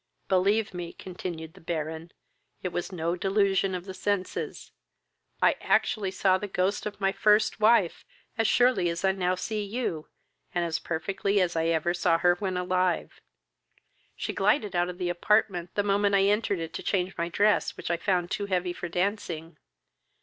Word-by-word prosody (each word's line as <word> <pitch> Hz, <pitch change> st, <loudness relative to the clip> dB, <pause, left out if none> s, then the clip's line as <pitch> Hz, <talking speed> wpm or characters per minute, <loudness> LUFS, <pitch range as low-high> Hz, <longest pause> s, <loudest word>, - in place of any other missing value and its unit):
"Believe 200 Hz, +3 st, +2 dB
me, 175 Hz, -1 st, -6 dB
(continued 170 Hz, -3 st, -7 dB
the -, -, -16 dB
Baron,) 160 Hz, 0 st, -4 dB, 0.5 s
it 185 Hz, -, -1 dB
was 175 Hz, +2 st, -4 dB
no 170 Hz, -1 st, -1 dB
delusion 195 Hz, 0 st, +1 dB
of 180 Hz, 0 st, -6 dB
the 190 Hz, -, -7 dB
senses. 200 Hz, -1 st, -3 dB, 0.7 s
I -, -, +5 dB
actually 200 Hz, -3 st, +1 dB
saw 190 Hz, 0 st, +2 dB
the 205 Hz, -, -4 dB
ghost 190 Hz, +2 st, -1 dB
of 210 Hz, -, -7 dB
my 195 Hz, -1 st, +2 dB
first 210 Hz, +2 st, +3 dB
wife 215 Hz, -5 st, +3 dB, 0.3 s
as 225 Hz, -2 st, +1 dB
surely 245 Hz, -8 st, +3 dB
as 170 Hz, +3 st, -2 dB
I 190 Hz, -, +5 dB
now 185 Hz, -1 st, 0 dB
see 210 Hz, +3 st, -3 dB
you, 200 Hz, -7 st, -3 dB, 0.5 s
and 175 Hz, -1 st, +1 dB
as 160 Hz, -1 st, -1 dB
perfectly 195 Hz, +4 st, -1 dB
as 180 Hz, -2 st, +1 dB
ever 165 Hz, 0 st, +1 dB
I -, -, -1 dB
saw 175 Hz, -2 st, +2 dB
her 175 Hz, +1 st, +4 dB
when 185 Hz, 0 st, -3 dB
alive. 180 Hz, 0 st, 0 dB, 0.9 s
She -, -, -4 dB
glided 210 Hz, -10 st, +1 dB
out 175 Hz, 0 st, +2 dB
of 180 Hz, -, -7 dB
the 180 Hz, -1 st, -2 dB
apartment 180 Hz, -1 st, +1 dB
the 205 Hz, -, +2 dB
moment 200 Hz, 0 st, +2 dB
I 195 Hz, -, +4 dB
entered 205 Hz, 0 st, +2 dB
it 165 Hz, -1 st, -5 dB
to -, -, -5 dB
change 185 Hz, -1 st, -1 dB
my 170 Hz, 0 st, -2 dB
dress, 205 Hz, +4 st, +2 dB
which -, -, -4 dB
I 170 Hz, -, +1 dB
found 180 Hz, -1 st, 0 dB
too 205 Hz, -, -2 dB
heavy 180 Hz, -2 st, 0 dB
for 175 Hz, -, -6 dB
dancing. 175 Hz, -4 st, -2 dB
185 Hz, 180 wpm, -27 LUFS, 175-200 Hz, 0.9 s, I